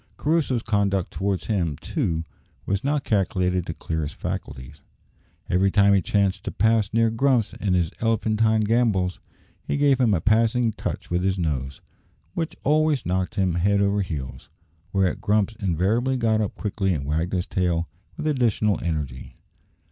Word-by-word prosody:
Crusoe's 145 -6 +1
conduct 100 -4 0
towards 95 -1 -2
him, 90 -9 0
too, 80 -2 -2 0.4
was 100 0 -1
not 145 0 0
calculated 90 -3 0
to 80 - -3
clear 80 -1 -3
his 75 -1 -4
faculties. 65 -1 -6 0.7
Every 95 +2 +2
time 100 0 +4
he 100 - +4
chanced 100 +1 0
to - - -2
pass 110 0 +2
near 115 0 +2
Grumps 120 -1 +1
in 95 -3 -1
his 85 -3 +1
elephantine 110 -1 +2
gambols, 105 -5 +1 0.4
he - - -2
gave 140 -2 +3
him 115 -6 +3
a - - +1
passing 115 +4 +2
touch - - -5
with 90 0 +1
his 95 +1 0
nose, 70 -6 -3 0.5
which 165 -2 -3
always 155 -1 +2
knocked 90 +1 -1
him 95 -4 +1
head 100 +4 +2
over 100 0 +2
heels; 70 -9 -6 0.4
whereat 95 -2 +1
Grumps 105 +1 +1
invariably 105 +8 +1
got 110 -2 +2
up 105 - -3
quickly 95 -3 -1
and 70 -2 -4
wagged 80 +5 -1
his 90 -1 0
tail 85 -2 0 0.3
with - - -5
additional 115 -8 +1
energy. 75 -7 -4
100 Hz, 160 wpm, -24 LUFS, 90-115 Hz, 0.7 s, time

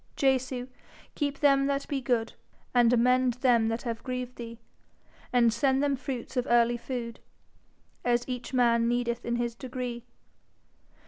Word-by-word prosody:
Jesu, 260 -2 0 0.5
keep 285 -2 -2
them 275 -1 +4
that 280 0 -1
be 275 -2 -2
good, 240 -2 0 0.4
And 240 -2 +5
amend 250 +1 +3
them 245 -3 +3
that 225 +1 -2
have 230 -2 -4
grieved 250 -1 -4
thee, 230 -1 -8 0.7
And 235 -2 +4
send 265 +3 +2
them 285 -1 +2
fruits 255 -1 -6
of 250 -1 0
early 240 0 +4
food, 235 -1 -5 0.8
As 240 0 +1
each 250 -1 -5
man 235 -2 +3
needeth 240 0 -1
in 235 - -1
his 240 -1 -1
degree. 245 -1 -5
245 Hz, 145 wpm, -28 LUFS, 235-260 Hz, 0.8 s, And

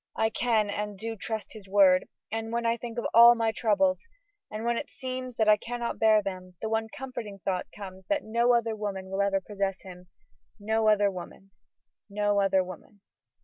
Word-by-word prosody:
I 220 0 +1
can 220 -4 +1
and 210 0 -4
do 225 +3 -5
trust 220 +1 -5
his 210 -3 -12
word, 190 -2 +5 0.2
and 225 +1 -3
when 235 0 -1
I 230 0 +2
think 235 0 -8
of 235 - -2
all 235 +1 +9
my 225 -1 +1
troubles, 275 - +1 0.4
and 215 +2 -5
when 235 0 +1
it 290 - -4
seems 255 -1 -6
that 220 -1 +1
I 210 0 +6
cannot 240 +1 -4
bear 215 -1 +5
them, 185 -2 -6
the 220 - -3
one 225 0 0
comforting 255 -7 -7
thought 185 -2 -1
comes 190 -2 -10
that 300 -1 0
no 235 +2 +2
other 230 -1 0
woman 195 -3 -5
will 195 +1 0
ever 200 -1 +2
possess 195 -1 -3
him; 180 -1 -12 0.5
no 220 +1 0
other 205 -1 +4
woman; 190 +1 -10 0.6
no 205 0 +1
other 195 -1 +3
woman. 185 +3 -12
215 Hz, 190 wpm, -28 LUFS, 195-230 Hz, 0.6 s, all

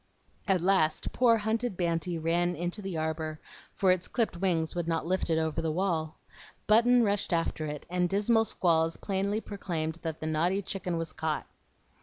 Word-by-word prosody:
At 190 -3 +2
last 180 -4 +2
poor, 235 -2 +4
hunted 220 -1 -1
Banty 170 0 -1
ran 170 +2 +1
into 175 +5 -3
the 190 -4 -4
arbor, 155 0 -3 0.4
for 190 -2 +3
its 185 -1 +1
clipped 230 -7 -1
wings 170 -3 0
would 175 -2 -3
not 165 -1 0
lift 185 +1 0
it 160 - +2
over 160 -2 0
the 160 - -1
wall. 160 -3 -1 0.5
Button 235 +3 +5
rushed 205 -2 0
after 165 -2 0
it, 150 -1 -6
and 180 0 0
dismal 225 +4 +3
squalls 165 -5 +1
plainly 200 +2 -1
proclaimed 170 -6 -4
that 160 -2 -4
the - - -5
naughty 170 +6 +1
chicken 185 -2 -3
was 165 -1 -3
caught. 160 -1 -2
175 Hz, 175 wpm, -29 LUFS, 160-195 Hz, 0.5 s, Button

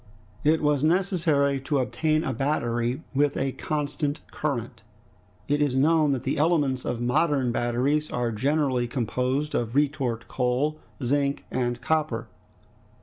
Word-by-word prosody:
It 155 +1 +3
was 145 -1 +2
necessary 155 -6 +2
to 140 +2 0
obtain 155 +4 +1
a 130 - -1
battery 120 0 -1
with 145 +1 +2
a 135 0 0
constant 145 +1 -2
current. 120 -5 -3 0.7
It 145 +1 +1
is 145 -3 +1
known 155 +2 +4
that 130 -2 -3
the 135 +1 -1
elements 145 -5 +2
of 120 - -2
modern 135 +1 +1
batteries 125 +6 0
are 120 -1 -1
generally 130 +1 +1
composed 130 +4 -1
of 120 0 -1
retort 135 -5 0
coal, 135 +5 0 0.2
zinc, 140 +2 0
and 120 -1 -1
copper. 150 -5 0
140 Hz, 135 wpm, -26 LUFS, 125-150 Hz, 0.7 s, known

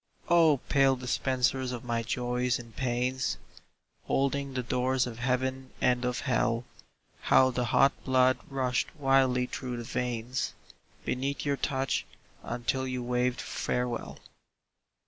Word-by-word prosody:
Oh, 165 -5 +5
pale 135 -1 +4
dispensers 130 0 0
of 120 -2 -5
my 120 -1 -1
Joys 125 +1 0
and 115 -2 -12
Pains, 130 +1 -1 0.7
Holding 140 0 0
the 125 - -1
doors 130 +1 +1
of 120 -2 -7
Heaven 130 +1 -1
and 125 0 +2
of 125 -1 -1
Hell, 120 -2 +1 0.5
How 130 0 +5
the 125 -1 -1
hot 135 +4 +4
blood 130 -1 +3
rushed 130 +2 -1
wildly 135 -3 +3
through 125 -1 -5
the 120 - -5
veins 125 +1 -2 0.5
Beneath 135 +4 -2
your 140 -1 +1
touch, 135 -2 -1 0.4
until 120 +2 -2
you 125 -1 -3
waved 125 0 0
farewell. 125 -1 -3
125 Hz, 125 wpm, -29 LUFS, 125-130 Hz, 0.7 s, Oh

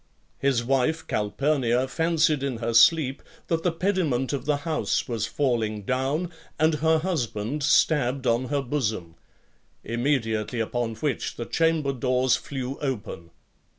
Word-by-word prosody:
His 135 -4 +1
wife 135 +6 +1
Calpurnia 125 +3 0
fancied 160 0 +1
in 135 -4 -2
her 115 0 -2
sleep 135 +3 +5 0.3
that 165 -1 +1
the 175 - +1
pediment 165 -8 0
of 140 - -3
the 150 0 +1
house 160 -2 0
was 115 -3 -2
falling 115 -6 -1
down, 135 - -1 0.3
and 155 +1 +3
her 160 0 +4
husband 145 - -2
stabbed 135 -2 +2
on 120 +2 +2
her 140 +1 -1
bosom; 110 - -2 0.7
immediately 120 -2 -1
upon 115 0 -2
which 135 +3 -2
the 120 - -5
chamber 160 -3 +1
doors 125 0 +2
flew 135 -1 -5
open. 110 - -4
135 Hz, 135 wpm, -25 LUFS, 115-150 Hz, 0.7 s, sleep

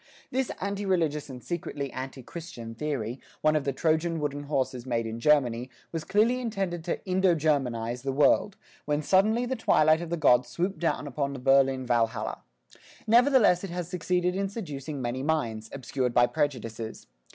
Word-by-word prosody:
This 260 0 0
anti 200 +1 -3
religious 160 -6 0
and 125 -3 -9
secretly 140 -2 -4
anti 130 0 -6
Christian 120 -7 -8
theory, 130 -2 -3 0.2
one 155 0 +3
of 150 - 0
the 140 - +1
Trojan 160 +4 0
wooden 145 -1 -3
horses 130 -3 -2
made 115 -2 0
in 115 +1 -5
Germany, 125 -3 +2 0.2
was 165 -2 -3
clearly 230 +5 +2
intended 195 -8 -2
to 175 - -3
"Indo 185 -1 +3
Germanize" 125 -6 0
the 135 +1 -2
world, 145 +8 +3 0.3
when 150 +1 0
suddenly 215 +8 +3
the 260 +2 -2
twilight 155 -8 +4
of 170 - -5
the 170 - -1
Gods 125 -5 +4
swooped 180 +8 -2
down 165 -3 0
upon 140 0 -2
the 135 - -6
Berlin 135 0 +3
Valhalla. 115 -2 0 0.6
Nevertheless 235 -6 +5
it 195 - -4
has 175 -1 -4
succeeded 180 0 0
in 195 0 -1
seducing 150 - -6
many 120 +2 -2
minds, 115 -8 -1
obscured 130 -2 -2
by 120 - +6
prejudices. 115 -6 -3
150 Hz, 170 wpm, -28 LUFS, 130-180 Hz, 0.6 s, by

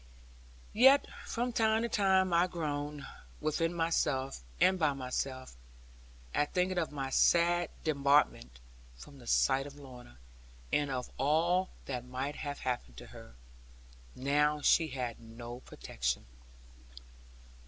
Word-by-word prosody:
Yet 265 +5 +6 0.2
from 240 +1 -2
time 220 0 +2
to - - 0
time 190 -4 +2
I 170 +2 +4
groaned 150 -4 -4 0.3
within 165 +2 0
myself 150 - 0 0.2
and 185 0 +4
by 155 -3 +2
myself, 130 - -4 0.8
at 145 - 0
thinking 180 0 +1
of 165 - -2
my 135 -2 -4
sad 175 +3 +3
debarment 140 - +2 0.4
from 140 - -13
the 120 - -14
sight 135 +3 +2
of 140 - -11
Lorna, 125 - -13 0.6
and 145 -1 +2
of 125 -2 -4
all 170 +7 +2 0.2
that 125 -3 -4
might 130 +3 -4
have 145 -1 -5
happened 125 -2 -3
to - - -10
her, 115 - -13 0.8
now 150 +3 +1
she 160 +2 +4
had 125 -4 -4
no 120 +1 -9
protection. - - -4
145 Hz, 125 wpm, -32 LUFS, 130-170 Hz, 0.8 s, Yet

